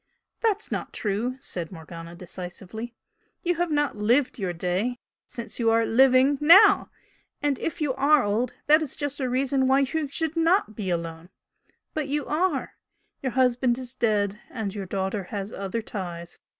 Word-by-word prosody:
"That's 440 -2 0
not - - -4
true," 225 +5 -2
said 175 -10 -5
Morgana, 165 0 -9
decisively 185 +6 -7 0.5
"You 350 - +2
have 350 0 0
not 295 -3 +1
'lived 240 +6 +1
your 190 -3 -1
day' 180 +8 -1 0.3
since 235 +1 -7
you 230 -1 +3
are 225 0 +3
living 265 +3 +4
NOW! 385 +8 +7 0.5
And 290 -2 0
if 325 - -3
you 290 -4 +1
are 280 +2 +4
old, 225 +4 0
that 305 +2 +6
is 300 -4 -3
just 290 -1 -3
a 260 -2 -1
reason 265 +1 +1
why 270 +1 +4
you 295 +3 -1
should 320 +3 -2
NOT 330 - +2
be 195 -3 -3
alone. 165 -1 -4 0.6
But 305 -3 -2
you 290 0 -1
ARE. 355 +5 0 0.5
Your 260 -2 -2
husband 250 -1 +2
is 255 -1 -7
dead, 210 -4 0
and 220 -6 -4
your 200 -2 -5
daughter 190 +1 -2
has 200 +1 -5
other 200 +3 -3
ties. 175 -5 -6
245 Hz, 165 wpm, -26 LUFS, 195-285 Hz, 0.6 s, NOW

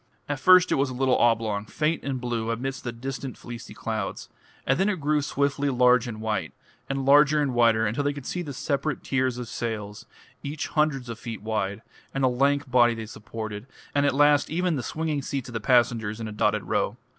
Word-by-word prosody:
At 145 -2 -2
first 185 +5 +6
it - - +3
was 140 - +1
a 130 - -6
little 130 0 +2
oblong, 110 -3 +2
faint 155 +8 -1
and 135 -2 -2
blue 120 -2 -2
amidst 130 +4 -3
the 120 - -3
distant 130 +2 -6
fleecy 120 -2 -9
clouds; 110 -3 -4 0.4
and 135 +5 +2
then 195 +2 +3
it 195 -4 -1
grew 150 +1 +1
swiftly 140 0 0
large 125 -1 +4
and 110 -2 -6
white, 100 -9 -2 0.4
and 135 -1 -2
larger 145 +2 +6
and 140 -3 0
whiter, 115 -2 +4
until 115 +7 -1
they 145 - +1
could 140 -2 -8
see 180 - -3
the 150 -5 -6
separate 140 +2 -2
tiers 130 -2 0
of 125 -1 -5
sails, 105 -3 -5 0.3
each 145 +2 -4
hundreds 150 -5 0
of 115 -1 -6
feet 115 -4 -7
wide, 110 -1 -2 0.3
and 135 - 0
the 130 - +5
lank 140 +3 +1
body 120 -2 +5
they 110 -1 -6
supported, 110 +1 -7 0.3
and 145 0 +3
at 140 - +1
last 145 0 +4
even 175 +1 0
the 130 - -2
swinging 155 +2 -2
seats 135 -2 -4
of - - -9
the 115 - -2
passengers 115 -2 +2
in 115 - -4
a - - -6
dotted 105 0 +1
row. - - -1
125 Hz, 215 wpm, -26 LUFS, 115-140 Hz, 0.4 s, first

